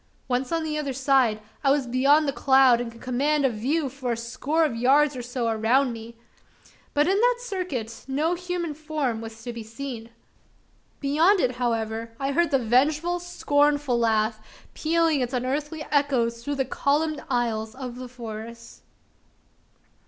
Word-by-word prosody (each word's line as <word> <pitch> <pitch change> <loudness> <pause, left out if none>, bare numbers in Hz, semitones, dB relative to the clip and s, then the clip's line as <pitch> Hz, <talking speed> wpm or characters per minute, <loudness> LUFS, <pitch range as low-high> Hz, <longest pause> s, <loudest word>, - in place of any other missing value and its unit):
Once 255 +2 -1
on 330 -1 0
the 305 -1 -2
other 280 -3 -3
side, 260 -4 +2 0.2
I 275 - +3
was 280 -1 +2
beyond 275 +5 +3
the 275 - 0
cloud, 265 -3 +5
and 235 -1 -5
could 230 - -15
command 280 +4 +1
a 265 - +3
view 275 +8 -1
for 255 -2 -3
a - - -4
score 280 +7 0
of 285 - -2
yards 275 +5 +3
or 250 - -4
so 245 0 -3
around 230 +4 +2
me; 230 +1 -9 0.8
but, 295 +2 +3
in 385 +2 +3
that - - +4
circuit, 365 - -5
no 300 +6 0
human 355 -2 -3
form 295 -6 -3
was 225 0 -9
to 240 - -5
be 230 - -6
seen! 230 +1 -7 0.9
Beyond 320 +8 +3
it, 250 - +2
however, 225 -2 -2
I 275 0 -1
heard 340 +3 +2
the 275 - +3
vengeful, 295 +9 +2
scornful, 290 -6 +1
laugh, 220 -1 +1 0.3
pealing 325 -2 +1
its 250 +1 -2
unearthly 295 +5 -2
echoes 250 -5 +1
through 285 +3 -2
the 270 -1 0
columned 295 +3 0
aisles 225 -3 -1
of 250 -2 -7
the 255 0 -7
forest! 230 -1 -9
265 Hz, 165 wpm, -25 LUFS, 235-300 Hz, 0.9 s, cloud